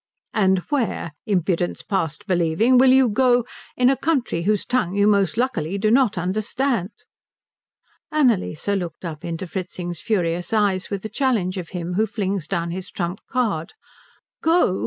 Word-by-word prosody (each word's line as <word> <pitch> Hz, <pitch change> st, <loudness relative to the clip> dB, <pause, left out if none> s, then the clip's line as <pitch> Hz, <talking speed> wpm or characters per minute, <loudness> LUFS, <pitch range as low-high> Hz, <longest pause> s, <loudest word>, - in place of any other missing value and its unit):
"And 190 Hz, -3 st, +3 dB
where, 240 Hz, -, -1 dB, 0.2 s
Impudence 180 Hz, -3 st, 0 dB
past 190 Hz, -1 st, -2 dB
believing, 185 Hz, +7 st, +3 dB
will 260 Hz, 0 st, +6 dB
you 265 Hz, -1 st, +6 dB
go, 245 Hz, +1 st, +3 dB, 0.3 s
in 250 Hz, -, +4 dB
a 270 Hz, -, +4 dB
country 270 Hz, -, 0 dB
whose 205 Hz, +2 st, +1 dB
tongue 245 Hz, -7 st, 0 dB
you 205 Hz, 0 st, +3 dB
most 200 Hz, 0 st, +2 dB
luckily 200 Hz, -8 st, -1 dB
do 215 Hz, +2 st, +1 dB
not 245 Hz, -5 st, +3 dB
understand?" 210 Hz, +4 st, -1 dB, 1.2 s
Annalise 240 Hz, -, +1 dB
looked 180 Hz, -4 st, -2 dB
up 160 Hz, -1 st, -6 dB
into 170 Hz, +1 st, -4 dB
Fritzing's 175 Hz, -2 st, -5 dB
furious 175 Hz, -3 st, -1 dB
eyes 200 Hz, -4 st, +1 dB
with 200 Hz, -2 st, -4 dB
the -, -, -3 dB
challenge 215 Hz, -10 st, 0 dB
of 170 Hz, -, -7 dB
him 180 Hz, -1 st, -4 dB
who 215 Hz, +4 st, +2 dB
flings 195 Hz, -6 st, -2 dB
down 170 Hz, +1 st, -2 dB
his 185 Hz, +2 st, -5 dB
trump 175 Hz, +1 st, -3 dB
card. 215 Hz, -11 st, -1 dB, 0.7 s
"Go?" 325 Hz, -, +3 dB
200 Hz, 155 wpm, -22 LUFS, 175-240 Hz, 1.2 s, will